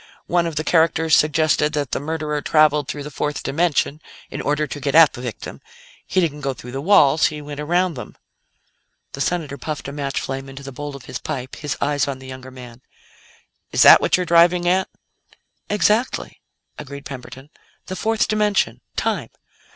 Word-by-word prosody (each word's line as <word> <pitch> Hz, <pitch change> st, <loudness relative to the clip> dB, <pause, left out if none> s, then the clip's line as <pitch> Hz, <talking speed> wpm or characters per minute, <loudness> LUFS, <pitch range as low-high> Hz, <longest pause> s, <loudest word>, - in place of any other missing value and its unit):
One 175 Hz, -1 st, +1 dB
of 165 Hz, -, -5 dB
the 155 Hz, -, -1 dB
characters 160 Hz, -1 st, +3 dB
suggested 155 Hz, 0 st, +2 dB
that 145 Hz, -4 st, -2 dB
the -, -, -1 dB
murderer 150 Hz, 0 st, -3 dB
traveled 150 Hz, -1 st, +3 dB
through 145 Hz, -1 st, -5 dB
the 150 Hz, -, -8 dB
fourth 150 Hz, +1 st, -3 dB
dimension 155 Hz, -1 st, 0 dB, 0.3 s
in -, -, -4 dB
order 150 Hz, +1 st, 0 dB
to 145 Hz, -, -7 dB
get 140 Hz, +1 st, -2 dB
at 165 Hz, -2 st, +7 dB
the 125 Hz, -, -8 dB
victim. 120 Hz, -3 st, -7 dB, 0.5 s
He -, -, +1 dB
didn't 150 Hz, -4 st, -1 dB
go 135 Hz, -1 st, -2 dB
through 125 Hz, +1 st, -10 dB
the 135 Hz, +2 st, -4 dB
walls; 160 Hz, -4 st, +5 dB
he 150 Hz, -1 st, -5 dB
went 145 Hz, 0 st, -8 dB
around 175 Hz, +4 st, +1 dB
them." 120 Hz, -6 st, -9 dB, 0.9 s
The 140 Hz, -, -6 dB
Senator 150 Hz, -4 st, -2 dB
puffed 150 Hz, +1 st, -5 dB
a -, -, -5 dB
match 140 Hz, -1 st, -3 dB
flame 135 Hz, 0 st, -5 dB
into 135 Hz, +1 st, -10 dB
the 135 Hz, -, -7 dB
bowl 145 Hz, +2 st, -7 dB
of 135 Hz, -, -11 dB
his 125 Hz, -, -6 dB
pipe, 130 Hz, -4 st, -5 dB
his 150 Hz, -2 st, -4 dB
eyes 145 Hz, -1 st, 0 dB
on 140 Hz, -2 st, -3 dB
the 130 Hz, -, -13 dB
younger 130 Hz, 0 st, -9 dB
man. 125 Hz, -2 st, -12 dB, 0.9 s
"Is -, -, +4 dB
that -, -, +9 dB
what -, -, +2 dB
you're 180 Hz, -, -1 dB
driving 175 Hz, +1 st, +4 dB
at?" 185 Hz, +2 st, +2 dB, 0.8 s
"Exactly," 210 Hz, +5 st, 0 dB, 0.4 s
agreed 140 Hz, -1 st, -9 dB
Camberton. 135 Hz, +1 st, -9 dB, 0.3 s
"The 185 Hz, -, -6 dB
fourth 220 Hz, +2 st, 0 dB
dimension. 210 Hz, -2 st, +1 dB
Time. -, -, -1 dB
150 Hz, 185 wpm, -21 LUFS, 140-165 Hz, 0.9 s, that